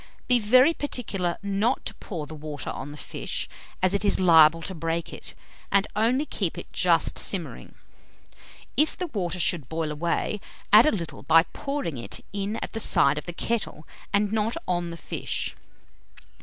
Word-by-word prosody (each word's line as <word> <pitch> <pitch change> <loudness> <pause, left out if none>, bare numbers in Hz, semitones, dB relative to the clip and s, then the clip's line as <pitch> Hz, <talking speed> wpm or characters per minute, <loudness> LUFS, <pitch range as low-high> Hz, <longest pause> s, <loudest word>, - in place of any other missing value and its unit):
Be 250 -1 +5
very 255 +8 +5
particular 200 - -2
not 200 +5 0
to - - -4
pour 165 -8 -6
the 155 - -10
water 150 -2 -6
on - - -6
the 150 - -10
fish, - - -4 0.4
as 185 +1 +4
it 200 - 0
is 200 - +2
liable 165 -2 +6
to 190 - -5
break 165 0 -3
it, - - -8 0.4
and 200 0 +4
only 245 +7 +2
keep - - -2
it - - -9
just - - +2
simmering. - - 0 1.0
If 305 +1 +2
the 365 - -2
water 190 - -3
should 165 -6 +1
boil 160 -1 -2
away, 170 +6 -1 0.3
add 220 +6 +9
a - - +4
little 170 -6 -5
by 165 0 +5
pouring 275 - -3
it 115 - -6
in 200 +1 -2
at - - -6
the 225 - -3
side 145 -8 +4
of 145 - -12
the - - -3
kettle, 205 -6 -3 0.2
and 205 0 +2
not 220 +3 0
on 175 -1 -1
the 170 - -7
fish. - - -4
190 Hz, 175 wpm, -26 LUFS, 165-220 Hz, 1.0 s, add